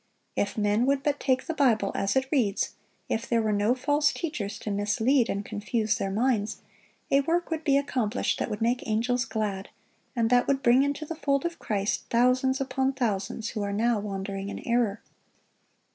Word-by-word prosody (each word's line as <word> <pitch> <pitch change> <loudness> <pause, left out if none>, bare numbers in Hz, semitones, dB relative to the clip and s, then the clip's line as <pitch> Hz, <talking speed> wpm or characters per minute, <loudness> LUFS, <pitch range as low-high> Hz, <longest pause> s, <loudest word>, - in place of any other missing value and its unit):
(1033) - - 0
If 205 +1 -1 0.2
men 245 - +2
would 275 0 +1
but 290 -1 0
take 260 -1 +1
the 330 - -2
Bible 230 -9 +2
as 195 0 0
it 265 0 +2
reads, 225 -9 +1 0.3
if 225 - -2
there 235 - +3
were 220 -1 +1
no 205 +4 +2
false 290 +2 +2
teachers 220 - -4
to 210 - -5
mislead 225 +5 +2
and 200 +1 -2
confuse 215 0 -1
their 195 - -1
minds, 215 0 0 0.5
a 275 - +5
work 335 +4 -1
would 320 -1 -2
be 275 -3 +4
accomplished 250 -5 -1
that - - -1
would 210 0 -3
make 245 +2 0
angels 240 +3 +1
glad, 205 -5 -3 0.5
and 230 -1 +1
that 245 0 +4
would 275 -1 +1
bring 240 +2 +5
into 285 +2 -1
the 330 - -4
fold 280 -2 0
of 340 0 -3
Christ 205 -1 -1
thousands 255 +2 +3
upon 265 0 0
thousands 220 -3 -2
who 215 - -4
are 200 0 -2
now 225 +2 +1
wandering 195 -1 -4
in - - -7
error. 235 -3 +1
235 Hz, 190 wpm, -27 LUFS, 210-270 Hz, 0.5 s, a